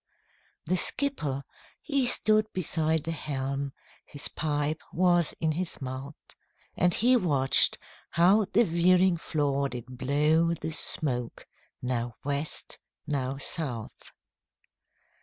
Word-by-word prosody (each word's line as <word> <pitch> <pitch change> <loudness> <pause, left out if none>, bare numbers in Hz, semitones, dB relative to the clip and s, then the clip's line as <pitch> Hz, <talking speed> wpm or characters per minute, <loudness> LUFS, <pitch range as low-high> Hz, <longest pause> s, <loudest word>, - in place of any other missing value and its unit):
The 185 +4 +1
skipper 155 - +2 0.4
he 280 -4 -1
stood 215 -2 +2
beside 160 -3 +1
the 165 - -4
helm, 140 -2 -4 0.3
His 145 - 0
pipe 150 0 -2
was 175 -2 +2
in 160 -1 0
his 170 +2 -4
mouth, 135 +2 -7 0.6
And 180 +1 +2
he 245 +7 +3
watched 145 - +5 0.3
how 190 +5 +3
the 235 - +4
veering 180 0 +2
flaw 140 -4 -1
did 125 -1 -9
blow 150 +5 +1
The 160 - -6
smoke 125 -6 0 0.4
now 120 -2 -3
West, 145 +2 -3 0.3
now 135 -2 -3
South. 135 -6 -5
155 Hz, 110 wpm, -27 LUFS, 135-175 Hz, 0.6 s, watched